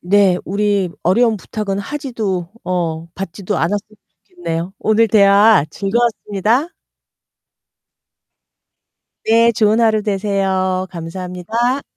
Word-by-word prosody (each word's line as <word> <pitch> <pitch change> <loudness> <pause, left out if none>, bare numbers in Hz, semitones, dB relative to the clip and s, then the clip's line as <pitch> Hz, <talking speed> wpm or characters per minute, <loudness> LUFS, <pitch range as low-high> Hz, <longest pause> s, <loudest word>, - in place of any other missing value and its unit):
네. 190 0 +3
우리 200 -2 0
어려운 220 +5 +3
부탁은 200 0 -4
하지도 215 - -3 0.2
어 165 -3 -2
받지도 195 +2 -4
않았으면 205 +1 -2 0.3
좋겠네요. 185 - -5
오늘 220 +1 +3
대화 200 -3 +5
즐거웠습니다. 225 - 0 2.6
네. 230 +1 +4
좋은 215 +1 +2
하루 220 -2 +3
되세요. 190 -2 -1
감사합니다. 180 +9 -3
200 Hz, 235 characters per minute, -17 LUFS, 185-225 Hz, 2.6 s, 대화